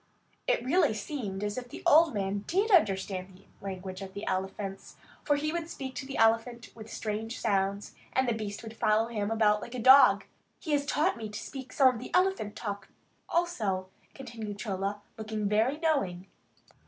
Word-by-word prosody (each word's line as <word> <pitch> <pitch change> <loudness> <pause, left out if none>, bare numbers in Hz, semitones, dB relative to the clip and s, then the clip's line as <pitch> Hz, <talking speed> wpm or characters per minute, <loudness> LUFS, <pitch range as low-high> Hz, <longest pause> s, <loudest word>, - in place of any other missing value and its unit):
It 240 - +1
really 275 -5 +3
seemed 210 -4 -4
as 210 +3 -2
if 245 -1 -11
the - - -9
old 315 -3 +6
man 200 0 -1
did 400 +5 +1
understand 190 - +2
the 195 - -22 0.2
language 190 -1 -6
of 190 0 -8
the 200 - -5
elephants, 195 +1 -4 0.3
for 290 - +3
he 305 +2 -1
would 340 -1 -3
speak 265 -4 -6
to 265 - -6
the 275 - -5
elephant 230 +1 +2
with 220 -1 -11
strange 220 +2 -4
sounds, 200 -2 0 0.2
and 260 -1 +1
the 240 - +2
beast 210 -1 -5
would 225 0 -8
follow 220 +1 +2
him 210 -3 -2
about 215 -2 +3
like 240 - -7
a - - -3
dog. 260 +4 +7 0.3
"He 315 - -6
has 285 -1 +1
taught 310 +1 +1
me 220 -2 -5
to 210 - -6
speak 265 -2 -8
some 270 - +5
of 230 - -6
the - - -7
elephant 365 - +1
talk, 205 -3 -5 0.4
also," 215 - 0 0.3
continued 225 -6 -7
Chola, 200 -1 -3 0.2
looking 215 -1 -2
very 220 +7 +2
knowing. 275 - 0
220 Hz, 185 wpm, -29 LUFS, 200-265 Hz, 0.4 s, dog